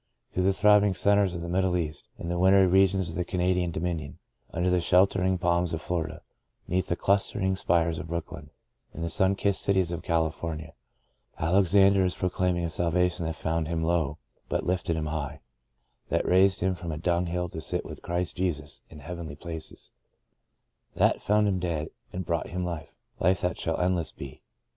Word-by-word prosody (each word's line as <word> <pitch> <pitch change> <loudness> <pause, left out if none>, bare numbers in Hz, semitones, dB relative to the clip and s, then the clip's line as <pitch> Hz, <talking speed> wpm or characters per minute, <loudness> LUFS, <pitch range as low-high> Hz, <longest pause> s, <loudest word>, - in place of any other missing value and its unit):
Through 90 - +1
the 95 - +4
throbbing 105 -1 +4
centres 100 +1 +3
of 85 - -4
the 85 - -5
Middle 95 +1 +1
West; 80 -3 -3
in - - -6
the 85 0 -1
wintry 95 +1 +6
regions 95 -1 +3
of - - -6
the 90 - 0
Canadian 90 0 0
Dominion; 80 -3 -3 0.3
under 90 +2 0
the 90 -1 +3
sheltering 95 +1 +3
palms 85 -1 +1
of 80 - -3
Florida; 80 -3 -3 0.4
'neath 90 +1 0
the 85 - 0
clustering 100 0 +1
spires 85 -3 +1
of - - -6
Brooklyn; 80 -3 -5 0.5
in 85 - -4
the 85 - -2
sun 95 +1 +2
kissed 100 0 0
cities 95 -3 +1
of 85 0 -3
California, 80 -1 -2 0.6
Alexander 95 +3 +4
is 90 -1 0
pro 90 -1 -1
claiming 90 -1 0
a 85 - -3
salvation 85 0 0
that 80 - -3
found 80 0 -1
him 80 0 -1
low 80 -3 0 0.3
but - - 0
lifted 90 -2 0
him 80 -1 -2
high; 75 -3 -4 0.7
that - - +1
raised 95 +1 +4
him 95 +1 +2
from 85 -2 -6
a 75 - -4
dung 85 +2 0
hill 90 +1 -2
to 80 - -6
sit - - -3
with - - -9
Christ 85 0 -2
Jesus 75 -6 -3
in 75 -2 -12
heavenly 85 -1 -6
places; 80 0 -8 1.0
that - - +3
found 105 0 +3
him 95 -2 +1
dead, 80 -3 -2 0.2
and 90 0 -4
brought 85 0 -1
him 90 +1 -3
life 85 -3 -6
— - - -52
" - - -35
life 95 +3 +2
that 90 -3 -1
shall 80 - -1
endless 90 -2 0
be." 70 -1 -10
90 Hz, 190 wpm, -27 LUFS, 80-95 Hz, 1.0 s, wintry